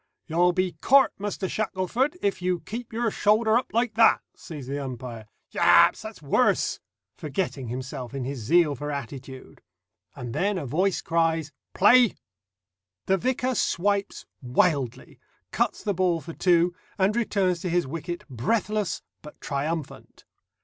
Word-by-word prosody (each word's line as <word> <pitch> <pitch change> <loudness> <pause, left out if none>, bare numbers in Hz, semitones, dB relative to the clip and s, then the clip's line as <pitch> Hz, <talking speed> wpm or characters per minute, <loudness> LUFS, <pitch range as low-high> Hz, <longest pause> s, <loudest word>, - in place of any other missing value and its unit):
"You'll 175 +2 +3
be 185 0 0
caught, 275 +1 +5
Muster 200 -1 -3
Shackleforth, 215 - -1
if 195 -2 0
you 180 -1 0
keep 235 +2 -7
your 230 0 -1
shoulder 215 +2 +3
up 245 - 0
like 235 0 0
that," 225 +1 +5
says 150 -6 -9
the 140 +2 -4
umpire. 120 -4 -7 0.2
"Ya - - +6
a - - -12
ps! - - -14
that's - - -9
worse!" - - +2 0.4
forgetting 145 -4 -3
himself 130 +1 -6
in 135 - -3
his 135 +1 -4
zeal 150 +6 +3
for 145 +2 -5
attitude. 135 -1 -8 0.5
And 120 -2 -6
then 200 +1 0
a 160 - -4
voice 180 +9 0
cries 165 -2 0 0.2
"Play!" 240 +2 +6 0.9
The 190 - +2
vicar 255 +3 0
swipes 200 -2 -1 0.2
wildly, 130 -1 0 0.3
cuts - - -1
the 205 - 0
ball 180 -2 +1
for 165 +1 -9
two, 175 0 +3 0.2
and 195 +3 +2
returns 195 -6 +1
to 180 - -3
his 175 +1 +1
wicket 165 +5 -6
breathless 200 - -1 0.2
but 150 - -13
triumphant. 150 +2 -5
175 Hz, 150 wpm, -25 LUFS, 140-205 Hz, 0.9 s, Ya